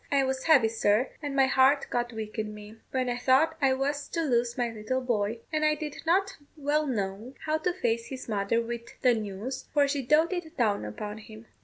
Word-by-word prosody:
I 280 -1 +4
was 265 0 -2
heavy, 280 -8 +6
sir, 220 +2 +2
and 290 -2 -4
my 270 -1 +5
heart 270 +1 +4
got 240 0 -1
weak 220 -1 -6
in 210 -1 -3
me, 210 +1 -11
when 255 -1 -1
I 245 0 -1
thought 270 +6 +3
I 270 -1 +4
was 285 +2 -2
to 330 - -2
lose 240 -4 +1
my 240 -2 0
little 225 +4 -2
boy; 225 -2 -1
and 310 0 +1
I 305 0 +4
did 300 -1 -6
not 385 +4 +2 0.2
well 300 +1 +1
know 215 +1 -3
how 310 0 +1
to 360 +3 0
face 235 -10 -1
his 260 -1 -7
mother 210 +1 +1
with 235 0 -7
the 250 -2 +6
news, 220 +4 -4
for 285 -1 +5
she 280 0 -1
doated 320 +5 +1
down 210 - +1
upon 210 - -6
him. 220 +1 -12
255 Hz, 210 wpm, -28 LUFS, 220-290 Hz, 0.2 s, heavy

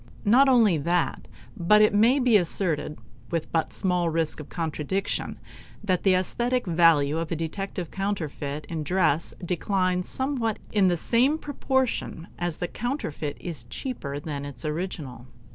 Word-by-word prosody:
Not 260 +6 +6
only 225 -9 +5
that, 170 +4 0 0.3
but 195 +5 +4
it 215 - +4
may 230 +6 +5
be 250 -4 +3
asserted 165 -5 0 0.3
with 165 -2 -3
but 165 -1 0
small 180 -2 +1
risk 165 -1 -1
of 150 - -9
contradiction 165 +3 -3 0.5
that 185 -4 +1
the 190 -2 +4
aesthetic 240 +7 0
value 165 -4 +4
of 165 -1 -4
a - - +1
detected 175 +2 -4
counterfeit 155 -7 -3
in 160 -2 -4
dress 165 -1 +1
declines 185 0 0
somewhat 260 -5 -1
in 200 -3 +4
the 175 -1 +2
same 250 - +2
proportion 265 - -2
as 175 -2 -2
the 175 - -2
counterfeit 170 - -4
is 155 -10 -6
cheaper 145 - -5
than 145 -1 -5
its 140 -3 -6
original. 150 -6 -4
175 Hz, 145 wpm, -26 LUFS, 155-210 Hz, 0.5 s, Not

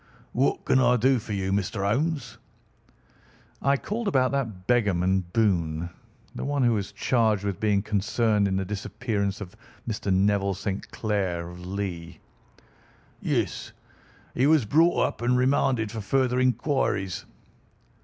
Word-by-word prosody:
"What 130 +3 0
can 130 - +4
I 125 -1 +4
do 130 +2 +3
for 110 -1 -6
you, 95 -1 -1
Mr. 100 +1 -1
Holmes?" 135 +1 -1 1.2
"I 140 +1 +3
called 215 - -4
about 130 -9 +2
that 115 -10 -3
beggarman, 95 -5 +2
Boone—the 85 -6 -2
one 140 -1 0
who 120 -1 +4
was 100 -3 -2
charged 110 -1 +1
with 100 -3 -2
being 105 -2 +2
concerned 105 0 +1
in 95 - -1
the 95 0 -1
disappearance 105 0 -3
of 95 0 -8 0.3
Mr. 105 -3 -2
Neville 100 0 +2
St. 100 +1 -4
Clair, 95 -6 -2
of 90 0 -10
Lee." 90 -4 -5 1.0
"Yes. - - -2 0.6
He 130 +3 +2
was 155 -6 +4
brought 165 +10 +4
up - - -4
and 125 +1 +2
remanded 125 -4 +2
for 110 -1 -5
further 125 +4 +1
inquiries." 130 - 0
105 Hz, 135 wpm, -26 LUFS, 95-125 Hz, 1.2 s, can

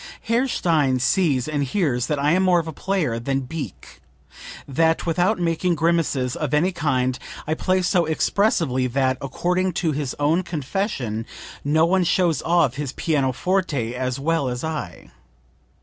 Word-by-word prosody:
"Herr 235 +4 +1
Stein 150 - +1
sees 135 0 +1
and 145 -2 -1
hears 135 - 0
that 150 - 0
I 145 +2 +2
am 185 +3 +3
more 185 -2 +4
of 165 - -4
a 160 - -5
player 160 -11 -1
than 135 +3 -1
Beecke, 140 - -8 0.7
that 160 +4 +1
without 175 +6 +1
making 175 0 0
grimaces 160 -6 +1
of 150 -2 -1
any 175 +6 +2
kind 130 -7 0 0.3
I 155 - 0
play 185 +3 0
so 175 -1 +2
expressively 160 - +1
that, 130 +1 0
according 180 +7 -1
to 165 -1 0
his 145 -3 -3
own 155 +5 +2
confession, 145 - -3 0.4
no 155 +3 +3
one 185 +2 +2
shows 170 -1 +2
off 165 -7 +2
his 140 -2 -4
pianoforte 145 -2 0
as 125 +1 -2
well 150 -2 0
as 125 0 -4
I. 155 - -5
155 Hz, 155 wpm, -22 LUFS, 130-175 Hz, 0.7 s, more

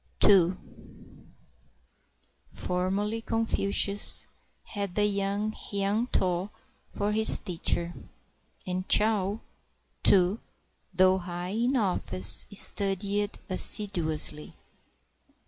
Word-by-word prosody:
II 185 -3 +4 1.9
Formerly 195 +5 -4
Confucius 205 -3 0 0.4
had 200 -4 -7
the 210 - +1
young 200 +1 -3
Hiang 205 +3 -4
Toh 185 -3 -2 0.4
for 205 +1 -4
his 220 +1 +7
teacher; 175 -2 -2 0.7
And 185 0 -6
Chau, 210 -1 +2 0.6
too, 190 +2 +3 0.5
though 185 +1 +2
high 175 0 -7
in 235 +6 -2
oflfice, 150 - +4
studied 200 +1 +1
assiduously. 170 -6 -1
200 Hz, 80 wpm, -26 LUFS, 180-210 Hz, 1.9 s, his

